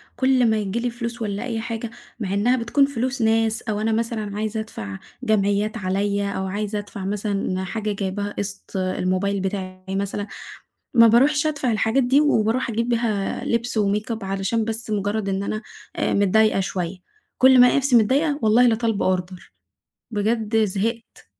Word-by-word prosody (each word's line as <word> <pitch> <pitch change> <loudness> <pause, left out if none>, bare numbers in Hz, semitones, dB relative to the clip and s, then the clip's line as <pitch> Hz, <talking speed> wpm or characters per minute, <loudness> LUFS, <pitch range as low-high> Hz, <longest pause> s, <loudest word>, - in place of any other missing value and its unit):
كُل 260 -3 +3
ما 220 - +2
ييجيلي 215 +4 -1
فلوس 235 0 -5
والّا 205 +1 -2
أي 230 -3 -3
حاجة، 230 0 -4 0.3
مع 195 -4 -3
إنها 235 +6 +3
بتكون 250 +4 +2
فلوس 260 -1 -2
ناس 225 0 +2
أو 210 -2 -3
أنا 225 - +1
مثلًا 220 -2 -2
عايزة 220 +1 -2
أدفع 105 - -6 0.3
جمعيات 210 0 +1
عليا 200 +1 -1
أو 190 - -3
عايزة 210 +2 -2
أدفع 205 -1 -7
مثلًا 200 -2 -2
حاجة 215 +2 -3
جايباها 200 +1 -3
قسط 200 -1 -5
آآ، 185 0 -1
الموبايل 190 +2 0
بتاعي 190 -1 -4
مثلًا، 200 +1 -2 0.7
ما 230 -1 +8
باروحش 290 +6 +4
أدفع 280 -5 0
الحاجات 225 +5 +2
دي، 265 +4 +4
وباروح 245 -4 +2
أجيب 230 +2 -1
بيها 225 -4 -1
لبس 235 0 -1
وmakeup 210 +2 -1
علشان 195 +4 -1
بس 225 0 -3
مجرد 205 0 -1
إن 195 0 -1
أنا 215 +2 -3 0.3
آآ - - 0
متضايقة 205 +1 +3
شوية 185 -1 -3 0.4
كُل 260 0 +7
ما 250 - +9
ألاقي - - +3
نفسي 270 -3 +3
متضايقة 285 +7 +3
والله 225 +3 +5
لطالبة 225 -5 +1
order 180 0 -9 0.6
بجد 220 +1 +1
زهقت. 225 +4 -4
215 Hz, 165 wpm, -22 LUFS, 200-235 Hz, 0.7 s, ما